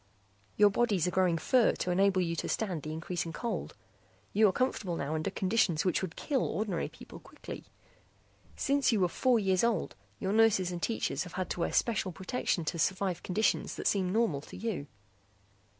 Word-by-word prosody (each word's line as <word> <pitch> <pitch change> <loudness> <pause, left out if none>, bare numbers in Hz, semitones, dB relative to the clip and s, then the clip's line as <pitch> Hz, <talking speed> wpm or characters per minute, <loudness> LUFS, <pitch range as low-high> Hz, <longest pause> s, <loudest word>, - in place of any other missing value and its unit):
"Your 205 -1 +6
bodies 205 -6 +1
are - - 0
growing 180 -2 +2
fur 245 +7 +3
to 180 - -2
enable 190 +1 +3
you 170 -1 -1
to - - -3
stand 185 -8 -1
the 155 - -6
increasing 170 +2 -3
cold. 235 +7 -4 0.6
You 215 +1 +5
are - - +3
comfortable 200 -7 -1
now 145 -1 -3
under 155 0 -1
conditions 185 -5 +1
which 180 - +1
would 185 -3 -4
kill 275 -4 0
ordinary 200 -5 -2
people - - -12
quickly. - - -10 0.9
Since 280 -1 +2
you 220 - +2
were 180 - +3
four 250 +7 +2
years 190 -3 +2
old 235 -2 0 0.2
your 195 0 -2
nurses 215 -5 +4
and 175 -1 -5
teachers 230 - -1
have 180 - -10
had 185 -1 -3
to - - -3
wear 170 - 0
special 215 -5 +1
protection 190 -2 -2
to 170 +2 -2
survive 190 +1 0
conditions 215 +4 0
that - - -6
seem 185 -3 +2
normal 210 -10 +1
to - - -11
you. 195 -8 -3
190 Hz, 185 wpm, -31 LUFS, 175-220 Hz, 0.9 s, Your